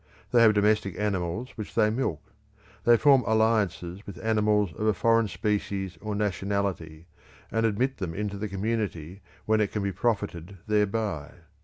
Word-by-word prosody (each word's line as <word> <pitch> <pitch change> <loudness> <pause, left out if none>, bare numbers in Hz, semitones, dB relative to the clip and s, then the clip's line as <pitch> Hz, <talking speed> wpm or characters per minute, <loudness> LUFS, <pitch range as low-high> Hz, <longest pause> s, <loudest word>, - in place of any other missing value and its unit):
They 120 - +5
have 110 -2 +6
domestic 105 -2 +2
animals 105 +3 -2
which 110 - -8
they 105 - +3
milk. 110 - -2 0.6
They 120 0 +6
form 135 0 +5
alliances 110 -5 +1
with 100 -3 -8
animals 105 -4 +2
of 110 - -2
a 110 - +3
foreign 115 +3 +3
species 100 -4 -2
or 105 -1 -3
nationality 100 -5 -2 0.5
and 115 +1 +2
admit 125 +5 0
them 90 -5 -4
into 100 0 -3
the 105 0 -3
community 100 -4 -3 0.2
when 110 0 +3
it 105 - 0
can 105 - -2
be 100 - -1
profited 100 -4 -2
thereby. 105 -7 0
105 Hz, 155 wpm, -27 LUFS, 95-110 Hz, 0.6 s, have